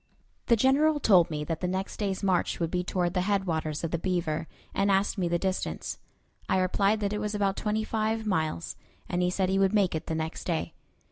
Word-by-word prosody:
The 235 - +6
General 285 +6 +3
told 185 - +5
me 150 -2 -3
that 160 +1 -3
the 180 - -1
next 190 +2 -3
day's 200 -2 -2
march 185 -3 +1
would 165 -1 -1
be 180 -1 0
toward 180 -1 -1
the 180 - +1
headwaters 170 -6 -1
of 165 - -2
the 170 - -1
Beaver, 165 -3 -1 0.3
and 200 +1 +1
asked 195 +1 +2
me 180 - +1
the 170 0 +1
distance. 190 +1 -3 0.5
I - - +3
replied 195 +3 +2
that 205 0 0
it 210 - -2
was 210 0 -2
about 200 -1 +1
twenty 215 +1 -1
five 220 0 -1
miles, 160 - -1 0.3
and 175 - -1
he 180 - +2
said 185 0 0
he 195 0 +2
would 195 +1 +3
make 200 -4 +3
it 160 - -4
the 160 - -2
next 160 +1 -4
day. 165 -3 -2
190 Hz, 220 wpm, -28 LUFS, 170-205 Hz, 0.5 s, The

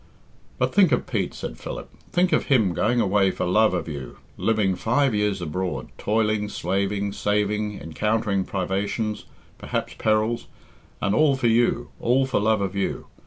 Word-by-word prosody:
"But - - 0
think 190 -6 +5
of - - +1
Pete," - - -2
said - - -6
Philip; - - -6 0.2
"think 180 +1 +2
of - - +2
him 110 - +3
going 120 +7 +1
away 100 -2 +3
for 90 - -2
love 100 +2 +3
of 90 - -3
you, 70 -5 -7 0.2
living 110 -4 +1
five 120 +7 +1
years 105 -3 0
abroad, 85 -4 -3
toiling, 105 -1 +1
slaving, 100 0 -1
saving, 105 0 0
encountering 105 +4 0
privations, 100 +3 -2 0.3
perhaps - - -3
perils, 110 +2 +1 0.6
and 100 0 +2
all 150 +2 +4
for 130 - -3
you, 120 +1 +2
all 130 +3 +2
for 130 - 0
love 110 0 +2
of 100 -1 -2
you. 100 - -2
105 Hz, 160 wpm, -24 LUFS, 95-115 Hz, 0.6 s, think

